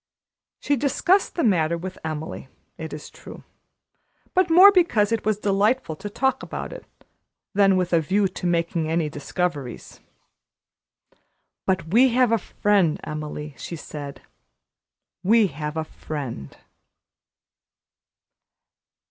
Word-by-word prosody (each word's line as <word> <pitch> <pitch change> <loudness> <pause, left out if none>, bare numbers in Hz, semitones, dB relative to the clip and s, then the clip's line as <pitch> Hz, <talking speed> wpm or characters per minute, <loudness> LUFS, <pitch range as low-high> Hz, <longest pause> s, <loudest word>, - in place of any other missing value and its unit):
She 285 - +1
discussed 350 +9 +1
the 340 - 0
matter 170 -6 +2
with 185 +2 -7
Emily, 155 -3 -5 0.3
it 160 -1 -7
is 150 - -8
true, - - -12 0.9
but 370 -1 +3
more 370 +5 +9
because 240 - +3
it 225 -2 0
was 215 -1 +1
delightful 205 -1 +1
to 205 - -6
talk 265 +5 0
about - - -6
it - - -10 0.7
than 195 -1 +4
with 180 -1 -1
a 165 - +4
view 195 +6 +1
to 180 - -5
making 170 -2 0
any 165 -1 0
discoveries. 145 -3 -4 1.7
"But 185 -4 0
we 245 +8 +5
have 250 -3 +4
a 230 - +3
friend, 195 -5 +1
Emily," 150 -1 -6
she 170 - -6
said; 145 -3 -8 1.0
"we 215 +4 +4
have 150 +1 -5
a 160 - 0
friend." 135 - -7
180 Hz, 125 wpm, -23 LUFS, 155-225 Hz, 1.7 s, more